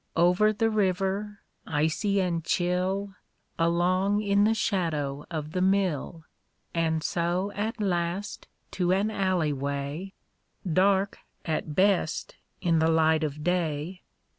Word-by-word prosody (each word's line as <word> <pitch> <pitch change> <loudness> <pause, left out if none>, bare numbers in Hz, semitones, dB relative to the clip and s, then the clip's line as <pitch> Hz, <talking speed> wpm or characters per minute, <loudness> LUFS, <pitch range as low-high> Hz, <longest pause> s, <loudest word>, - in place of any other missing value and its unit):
Over 180 +5 +4
the 225 +1 0
river, 200 0 -1 0.3
icy 160 +7 +1
and 170 -3 -1
chill, 185 +4 0 0.5
Along 180 +4 +2
in 205 -1 +3
the 225 +1 +3
shadow 155 -10 -1
of 155 -3 -4
the 180 - -1
mill, 185 -4 0 0.5
And 160 -1 0
so 175 +4 -1
at 215 +3 -3
last 180 0 -2 0.2
to 180 -1 0
an 200 +3 +1
alley 185 -7 +1
way, 140 +7 -4 0.5
Dark 190 +3 +2 0.3
at 155 -2 -2
best 190 -4 +1 0.3
in 170 -3 +2
the 160 +1 +3
light 160 -1 +3
of 150 0 -3
day. 175 0 -1
180 Hz, 120 wpm, -27 LUFS, 160-195 Hz, 0.5 s, Over